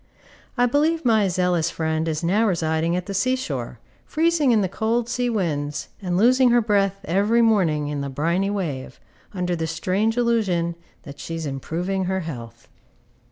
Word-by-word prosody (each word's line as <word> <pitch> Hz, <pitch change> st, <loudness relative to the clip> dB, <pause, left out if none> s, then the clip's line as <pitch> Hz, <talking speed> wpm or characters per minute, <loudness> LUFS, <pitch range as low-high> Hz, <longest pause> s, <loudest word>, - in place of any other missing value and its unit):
I 245 Hz, -, +4 dB
believe 305 Hz, +4 st, +1 dB
my 220 Hz, -4 st, +4 dB
zealous 180 Hz, -2 st, +1 dB
friend 160 Hz, -1 st, -2 dB
is 155 Hz, 0 st, -2 dB
now 205 Hz, +7 st, +2 dB
residing 165 Hz, -2 st, 0 dB
at 180 Hz, 0 st, -2 dB
the 200 Hz, -, -5 dB
sea 255 Hz, +7 st, +1 dB
shore, 260 Hz, +1 st, -5 dB, 0.3 s
freezing 320 Hz, -4 st, +2 dB
in 220 Hz, -3 st, +4 dB
the 190 Hz, -, +1 dB
cold 225 Hz, +5 st, -1 dB
sea 245 Hz, 0 st, -1 dB
winds, 150 Hz, -9 st, -2 dB
and 180 Hz, -2 st, -1 dB
losing 250 Hz, +4 st, +5 dB
her 240 Hz, 0 st, +5 dB
breath 200 Hz, -3 st, +1 dB
every 205 Hz, +7 st, +2 dB
morning 170 Hz, -10 st, +2 dB
in 145 Hz, -1 st, -3 dB
the 140 Hz, -, -4 dB
briny 170 Hz, +8 st, 0 dB
wave, 160 Hz, -10 st, -4 dB, 0.3 s
under 180 Hz, -2 st, -2 dB
the 165 Hz, -1 st, -2 dB
strange 195 Hz, +7 st, 0 dB
illusion 205 Hz, -8 st, +1 dB, 0.3 s
that 140 Hz, 0 st, -11 dB
she 165 Hz, -, -5 dB
is 165 Hz, -1 st, -4 dB
improving 175 Hz, +7 st, -3 dB
her 190 Hz, +1 st, -1 dB
health. 115 Hz, -8 st, -8 dB
185 Hz, 170 wpm, -23 LUFS, 160-225 Hz, 0.3 s, losing